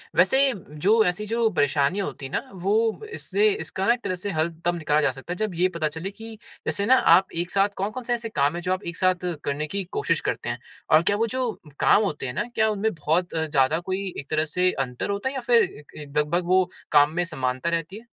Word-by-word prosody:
वैसे 265 +10 +4 0.2
जो 200 +9 +3
ऐसी 185 +4 -1
जो 230 0 +2
परेशानी 145 +2 +1
होती 145 -7 -4
है 135 - -7
ना - - -3
वो 215 - 0
इससे 425 +1 +1
इसका 195 - -3
न - - +6
एक 245 - -6
तरह 185 - -1
से 200 +3 -5
हल 160 +1 0 0.2
तब 175 0 +2
निकाला 155 -1 +1
जा 135 - +2
सकता 135 +7 -7
है - - -8
जब 215 -4 -2
ये 180 +2 +3
पता 155 -2 0
चले 165 +6 -6
कि 225 +1 -10 0.3
जैसे 200 - 0
ना 260 +3 +6
आप 190 -6 +5
एक 175 +1 -2
साथ 200 +1 +3
कौन-कौन 215 +6 -3
से 240 0 -1
ऐसे 230 -1 -3
काम 145 -4 +1
है 175 - -4
जो 185 +1 0
आप 185 - -4
एक - - -14
साथ 185 -1 +1 0.2
करने 145 +2 -2
की 200 +4 -2
कोशिश 425 - +1
करते - - -3
हैं - - -3 0.3
और 155 +1 +7
क्या - - +2
वो 230 +1 +1
जो 255 -1 -1 0.3
काम 215 - +5
होते 150 -9 -3
हैं 125 - -4
ना 205 - -1
क्या 220 0 +3
उनमें 215 0 0
बहुत 165 +3 0
ज़्यादा 155 -1 +2
कोई 190 +2 -3
एक 140 - -9
तरह 155 0 +1
से 180 +4 +1 0.2
अंतर 125 +9 -5
होता 200 +6 -1
है 275 - -7
या 260 - -2
फिर 235 -1 +4
एक 145 - -8
एक 145 -1 -8
लगभग 170 +4 +1
वो 185 +1 +5 0.3
काम 145 0 +6
में 175 - +1
समानता 130 +1 -2
रहती 170 +4 -2
है? 240 - -20
185 Hz, 245 wpm, -25 LUFS, 155-215 Hz, 0.3 s, और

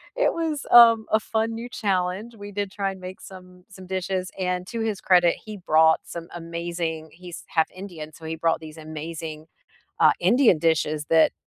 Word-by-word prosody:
it - - +2
was, 320 -3 -2
um, 230 -2 +8
a 220 - +4
fun 225 +1 -1
new 230 +2 -6
challenge. 195 +1 -2
We 205 -1 -9
did 200 -1 -3
try 195 0 -2
and 190 - -10
make 185 +1 -9
some 180 -1 -13
some 190 -1 -12
dishes 185 0 -3
and 180 -1 -1
to 230 - -4
his 220 -3 -2
credit, 175 -2 +4
he 215 -1 -7
brought 160 -3 +4
some 170 -1 -8
amazing 170 -1 -4
he's 175 0 -10
1/2 160 -1 +2
Indian, 175 -5 -8
so 160 - -13
he 160 0 -3
brought 165 0 +1
these 155 0 -10
amazing, 155 0 -7 0.6
uh, - - +7
Indian 220 - +4
dishes 155 -2 0
that, 160 -1 +5
180 Hz, 185 wpm, -24 LUFS, 165-205 Hz, 0.6 s, um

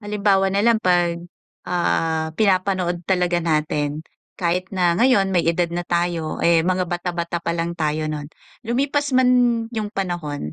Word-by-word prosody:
halimbawa 200 -2 +1
na 200 +1 +1
lang 230 -1 +4
pag, 175 -3 +1 0.5
ah, 160 -2 0
pinapanood 185 -3 0
talaga 180 -1 +1
natin 150 -2 -1 0.4
kahit 180 +1 -1
na 180 -3 +1
ngayon 205 -6 +3
may 175 -2 +2
edad 170 +1 +1
na 175 - -2
tayo, 170 -2 -2
eh, 170 -1 +5
mga 185 +2 0
bata, 175 +1 -3
bata 170 0 -2
pa 170 0 -2
lang 170 0 -2
tayo 155 -1 -1
nun, 150 -1 -5 0.4
lumipas 280 +5 0
man 255 -1 +4 0.4
yung 215 -2 -3
panahon, 165 - -4
175 Hz, 155 wpm, -21 LUFS, 165-195 Hz, 0.5 s, eh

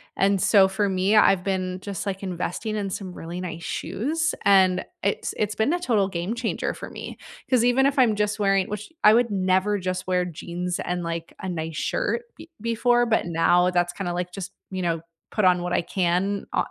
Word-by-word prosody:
and 195 +1 +2
so 195 0 +5
for 195 +2 0
me, 190 +2 +1
I've 195 -3 +5
been 185 -1 -2
just, 200 -1 -5
like, 195 -1 -3
investing 185 +3 -3
in 200 -2 -2
some 190 -1 -5
really 175 +1 -6
nice 170 -2 -6
shoes, 285 - -2
and 185 -2 +4 0.2
it's 200 - -1
it's 210 0 -1
been 220 +9 +1
a 355 - 0
total 220 - +1
game 180 +4 -3
changer 235 -1 -2
for - - -8
me - - -8 0.3
'cause 250 -3 +3
even 250 +2 +4
if 280 - -1
I'm 240 -5 +4
just 210 0 0
wearing 195 -2 +2
which 210 +7 -6
I 210 - +8
would 235 0 +3
never 190 +1 +1
just 185 0 -3
wear 180 -1 +1
jeans 175 +1 -4
and, 180 0 -2
like, 165 0 -4
a 190 - -4
nice 160 -3 -4
shirt 480 - -1
b 330 - -13
before, 240 +1 +2
but 225 - +2
now 175 +2 +3
that's 175 0 +1
kinda, 175 -2 -3
like, 180 0 -3
just, 195 0 -6 0.2
you 185 -1 -4
know, 165 -2 0 0.3
put 215 - +1
on 180 -1 +4
what 175 0 -2
I - - +2
can 185 +3 0
o - - +1
190 Hz, 210 wpm, -24 LUFS, 180-210 Hz, 0.3 s, I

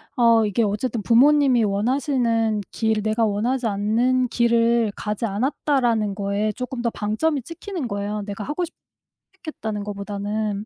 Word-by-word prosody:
어 230 -2 +4
이게 210 +2 +1
어쨌든 215 +3 -1
'부모님이 255 +1 +4
원하시는 230 0 0
길, 220 -1 0
내가 220 +1 +1
원하지 230 +4 0
않는 235 +5 +1
길을 235 -1 +2
가지 210 +2 -3
않았다.'라는 230 -1 0
거에 205 +1 -1
조금 250 +2 -5
더 235 - +1
방점이 260 +9 -1
찍히는 330 - -6
거예요 205 +1 -3
내가 205 0 -6
하고 300 +5 -2
싶 345 - -5 0.7
선택했다는 220 - -5
것보다는. 205 +1 -3
225 Hz, 330 characters per minute, -22 LUFS, 210-250 Hz, 0.7 s, 어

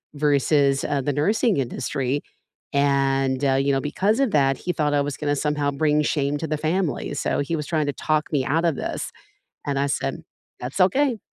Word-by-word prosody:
versus, 140 -1 +2
uh, 145 -1 0
the 145 +1 -1
nursing 210 - +2
industry, 135 +1 -2 0.5
and, 135 -1 +2
uh, 135 - +3
you 135 +1 +2
know, 135 - +2
because 200 - 0
of 270 -5 +2
that, 135 -2 +3
he 180 - -3
thought 150 -2 0
I 145 - +3
was 145 -1 -3
gonna 145 -1 0
somehow 150 0 0
bring 150 +1 +2
shame 145 -1 0
to 160 - -3
the 155 0 -1
family, 160 -1 -1
so 135 - -1
he 145 +4 -1
was 150 -1 -4
trying 155 -3 0
to 145 - -1
talk 155 0 -1
me 135 -3 +2
out 165 +3 +1
of 165 - +2
this, - - -4 0.6
and 140 -1 -1
I 140 - +1
said, 70 - -2 0.4
"That's 130 +9 -5
okay" 245 +6 +3
145 Hz, 200 wpm, -23 LUFS, 140-155 Hz, 0.6 s, uh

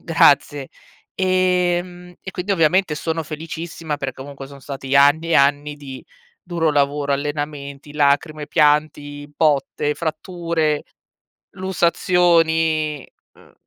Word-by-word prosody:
Grazie! 145 -3 +3 0.5
Ehm, 180 -1 0
e 190 - -7
quindi, 185 +3 -2
ovviamente, 175 -1 +2
sono 165 +1 -2
felicissima, 160 0 -6
per 135 -2 -3
comunque, 135 0 -9
sono 140 0 -13
stati 135 0 -2
anni 145 +4 +4
e - - +3
anni 145 +1 +2
di 135 -3 -9 0.4
duro 165 -3 0
lavoro. 145 0 +1
Allenamenti, 145 0 -4
lacrime, 150 +1 +1
pianti, 145 -1 +1
botte, 150 -1 +1
fratture, 160 -1 -2 0.7
lussazioni, 165 -4 +1 0.3
uhm, - - -21
155 Hz, 105 wpm, -20 LUFS, 145-170 Hz, 0.7 s, anni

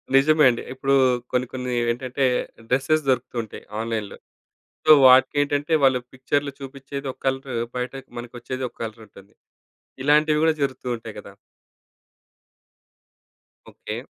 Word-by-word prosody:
నిజమే 155 +3 +5
అండి. 120 - -2
ఇప్పుడూ 135 +1 0 0.4
కొన్ని 125 0 +1
కొన్ని 125 -1 -4 0.2
ఏంటంటే 130 +3 -3 0.5
డ్రెసెస్ 145 +5 +2
దొరుకుతూ 130 -1 0
ఉంటాయి, 110 - -11 0.2
ఆన్‌లైన్‌లో. 110 -3 -4 0.7
సో, - - +3 0.2
వాటికేంటంటే 145 +3 +4
వాళ్ళు 130 -1 +4
పిక్చర్‌లో 140 +2 -1
చూపిచ్చేది 135 +1 -7
ఒక - - -27
కలరు. 135 -1 -2 0.2
బయటకి 130 +2 -5
మనకొచ్చేది 120 +2 -6
ఒక - - -29
కలరుంటుంది. 110 -3 -11 0.7
ఇలాంటివి 150 +2 +3
గూడా 160 0 +3
జరుగుతూ 130 -2 -3
ఉంటాయి 115 -2 -10
గదా! 100 -1 -11 2.4
ఓకే. - - -7
130 Hz, 115 wpm, -23 LUFS, 120-140 Hz, 2.4 s, నిజమే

